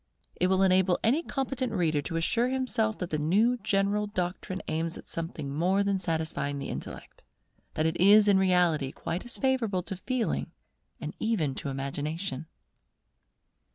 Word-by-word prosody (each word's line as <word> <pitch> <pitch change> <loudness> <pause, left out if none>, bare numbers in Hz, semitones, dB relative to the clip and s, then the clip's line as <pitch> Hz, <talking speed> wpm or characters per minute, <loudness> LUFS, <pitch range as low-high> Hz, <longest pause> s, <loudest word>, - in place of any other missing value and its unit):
It 180 - +1
will 190 +1 +3
enable 185 -1 +4
any 265 +9 +3
competent 270 -5 -2
reader 160 -6 +1
to 165 - -5
assure 230 +9 +1
himself 245 -5 0
that 180 - -5
the 155 - 0
new 210 +11 +3
general 205 -1 +1
doctrine 185 0 -3
aims 165 +1 -2
at - - -12
something 160 -4 -4
more 185 +6 +2
than 200 -1 0
satisfying 160 -4 -1
the 140 - -5
Intellect; - - -8 0.5
that 155 - +1
it 160 +1 0
is 205 +2 +7
in 200 -2 +5
reality 175 -7 +2
quite 165 +2 -4
as 240 - -6
favourable 230 -9 +1
to 195 - -4
Feeling 245 +5 -2 0.5
and - - -5
even 190 -12 0
to 140 +1 -5
Imagination. 145 +4 -4
185 Hz, 155 wpm, -28 LUFS, 160-215 Hz, 0.5 s, is